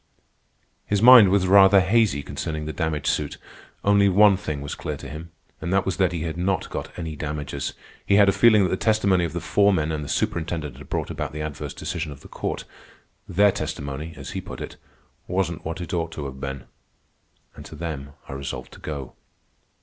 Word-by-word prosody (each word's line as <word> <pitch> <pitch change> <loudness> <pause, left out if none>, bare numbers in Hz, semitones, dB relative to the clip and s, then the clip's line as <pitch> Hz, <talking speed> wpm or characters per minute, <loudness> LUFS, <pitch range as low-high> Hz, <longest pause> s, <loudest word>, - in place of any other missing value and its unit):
His 100 - +1
mind 120 -3 +9
was 95 -1 +3
rather 95 +1 +7
hazy 95 -5 +2
concerning 75 -1 -4
the 80 - -4
damage 80 0 -2
suit. 75 -1 -1 0.5
Only 100 0 +4
one 100 +1 +6
thing 75 -7 -4
was 70 - -5
clear - - -5
to 70 - -9
him, 75 +4 -8 0.3
and 85 - -3
that 95 0 +2
was 95 - -2
that 95 -3 +2
he 85 -2 -3
had 80 0 -4
not 90 +1 -1
got - - -4
any 80 -3 -5
damages. 75 -1 -4 0.3
He 100 - +2
had 100 0 +6
a - - +6
feeling 105 +1 +5
that 90 - 0
the 95 - 0
testimony 100 -5 +2
of 80 - -5
the - - -2
foremen 95 -7 +2
and 75 -1 -3
the 70 - -7
superintendent 80 -5 -2
had 70 0 -13
brought - - -2
about - - -4
the 75 - -5
adverse 75 -2 -6
decision 80 -3 -4
of 70 0 -11
the - - -12
court. - - -4 0.7
Their 100 +3 +4
testimony, 75 0 -5
as - - -7
he - - -4
put - - -9
it, - - -7 0.5
"wasn't 90 -3 -1
what 80 +1 -4
it 85 0 -6
ought 85 -2 -1
to 75 - -5
have 65 -1 -7
ben." 70 -1 -5 0.9
And - - -10
to - - -11
them 75 -3 -6
I - - -7
resolved 70 0 -6
to - - -13
go. 70 -4 -6
85 Hz, 205 wpm, -24 LUFS, 75-95 Hz, 0.9 s, mind